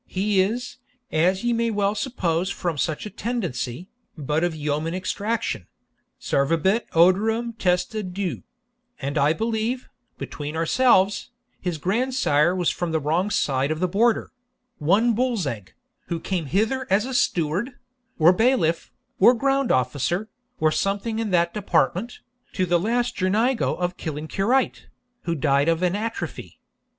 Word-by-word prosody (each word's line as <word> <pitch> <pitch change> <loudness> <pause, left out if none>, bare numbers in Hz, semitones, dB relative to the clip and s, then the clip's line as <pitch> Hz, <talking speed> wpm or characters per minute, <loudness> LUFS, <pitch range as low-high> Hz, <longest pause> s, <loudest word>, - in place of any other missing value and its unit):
He 195 0 +1
is, 240 +7 -3 0.3
as 180 +5 +2
ye 240 0 +1
may 230 0 +1
well 205 -2 +1
suppose 185 -7 -1
from 175 -4 -2
such 155 +4 -1
a - - -5
tendency, 180 - -3 0.3
but 150 +2 -1
of 175 -2 0
yeoman 155 +2 -2
extraction 200 - -2 0.5
servabit 165 +10 +1
odorem 220 +7 +3
testa 180 +3 0
diu 185 0 -4 0.6
and 140 +2 -3
I 150 +1 +3
believe, 225 +4 -2 0.3
between 150 +1 -6
ourselves, 195 +3 +3 0.3
his 175 -3 -2
grandsire 185 - +1
was 180 -2 +1
from 175 -2 -3
the 160 - +1
wrong 165 +7 0
side 135 -7 +1
of 155 0 -2
the 185 - +1
Border 220 +5 +1 0.5
one 205 +10 +3
Bullsegg, 190 - -2 0.3
who 170 - -2
came 175 -3 -3
hither 225 - 0
as 200 +4 +3
a 265 - -5
steward, 185 - 0 0.4
or 165 +3 +6
bailiff, 185 -7 +1 0.3
or 240 +6 +7
ground 275 +1 +1
officer, 145 - 0 0.3
or 155 0 +3
something 205 +6 -1
in 225 -2 -1
that 170 -2 +2
department, 210 +1 0 0.3
to 185 - 0
the 175 -1 +2
last 240 +6 0
Girnigo 220 +7 +1
of 180 0 -2
Killancureit, 195 - -1 0.4
who 170 -1 0
died 140 +1 +2
of 165 +2 +1
an 180 +1 +2
atrophy. 225 +2 -5
185 Hz, 140 wpm, -24 LUFS, 160-225 Hz, 0.6 s, or